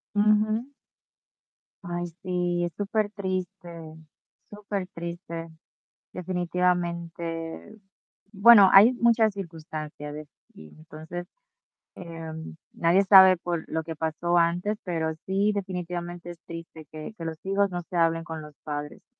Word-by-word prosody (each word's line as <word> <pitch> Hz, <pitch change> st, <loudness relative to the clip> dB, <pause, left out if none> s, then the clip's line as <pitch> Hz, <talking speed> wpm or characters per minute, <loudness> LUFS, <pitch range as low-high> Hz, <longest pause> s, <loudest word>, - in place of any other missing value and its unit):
Ujú. 215 Hz, +5 st, +2 dB, 1.1 s
Ay, 175 Hz, 0 st, -3 dB
sí, 175 Hz, -1 st, -1 dB
es 175 Hz, -, -2 dB
supertriste 195 Hz, -3 st, -2 dB, 0.8 s
supertriste, 175 Hz, -5 st, -6 dB, 0.6 s
definitivamente. 175 Hz, 0 st, -2 dB, 0.6 s
Bueno, 205 Hz, -1 st, +8 dB
hay 210 Hz, +6 st, +9 dB
muchas 230 Hz, -3 st, +3 dB
circunstancias 155 Hz, -5 st, -7 dB
ves, 150 Hz, -1 st, -8 dB, 0.3 s
y 80 Hz, -, -13 dB
entonces, 160 Hz, +3 st, -8 dB, 0.7 s
em, 160 Hz, -2 st, -8 dB, 0.2 s
nadie 175 Hz, +4 st, +3 dB
sabe 190 Hz, -1 st, +8 dB
por 170 Hz, -1 st, -3 dB
lo 160 Hz, 0 st, -2 dB
que 160 Hz, -1 st, -7 dB
pasó 165 Hz, +2 st, 0 dB
antes, 175 Hz, +5 st, +1 dB
pero 160 Hz, -3 st, -1 dB
sí, 200 Hz, +2 st, +2 dB
definitivamente, 175 Hz, -3 st, -5 dB
es 170 Hz, -, -10 dB
triste 165 Hz, -2 st, -9 dB
que 155 Hz, +6 st, -8 dB
que 165 Hz, -, -6 dB
los 160 Hz, -1 st, -5 dB
hijos 195 Hz, +1 st, +2 dB
no 175 Hz, -1 st, -4 dB
se 180 Hz, -, -4 dB
hablen 165 Hz, 0 st, +2 dB
con 160 Hz, -2 st, -6 dB
los 150 Hz, -1 st, -11 dB
padres. 150 Hz, -1 st, -6 dB
175 Hz, 115 wpm, -26 LUFS, 165-195 Hz, 1.1 s, hay